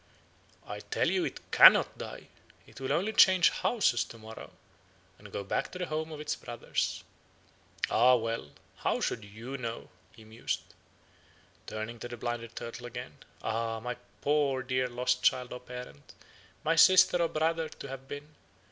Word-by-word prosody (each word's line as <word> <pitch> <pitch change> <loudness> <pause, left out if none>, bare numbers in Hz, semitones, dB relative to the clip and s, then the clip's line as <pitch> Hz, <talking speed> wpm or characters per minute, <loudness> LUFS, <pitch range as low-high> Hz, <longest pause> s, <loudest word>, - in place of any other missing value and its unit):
"'I - - -6
tell - - 0
you - - +1
it - - -7
cannot - - +8
die; - - -8 0.4
it - - -14
will 135 0 -2
only 195 +9 +1
change 185 -3 +6
houses 185 - +1
to 115 - -12
morrow, 110 0 -10 0.7
and - - -13
go 100 - -4
back 100 - -2
to - - -7
the 180 - -2
home 155 0 -3
of 155 - -7
its 150 - -2
brothers. - - -3 0.9
Ah, 125 +2 +6
well! 115 -8 -2 0.3
How - - 0
should 115 - -2
you 115 +7 -8
know?' 115 -2 -5 0.3
he 110 - -14
mused. 110 +1 -3 1.1
Turning 110 +2 -5
to 120 - -5
the 120 0 -7
blinded 120 -1 -4
turtle 120 +1 -6
again: 120 - -8 0.2
'Ah! 115 0 -1
my 125 +2 -4 0.3
poor 140 -3 +1
dear 130 0 0
lost 125 +1 0
child 125 -1 +2
or 125 - -6
parent, 125 - -10 0.5
my 160 +2 +2
sister 180 +1 +7
or 170 - +3
brother 160 +1 0
to - - -9
have 135 0 -8
been! 145 +2 -8
125 Hz, 165 wpm, -30 LUFS, 115-150 Hz, 1.1 s, cannot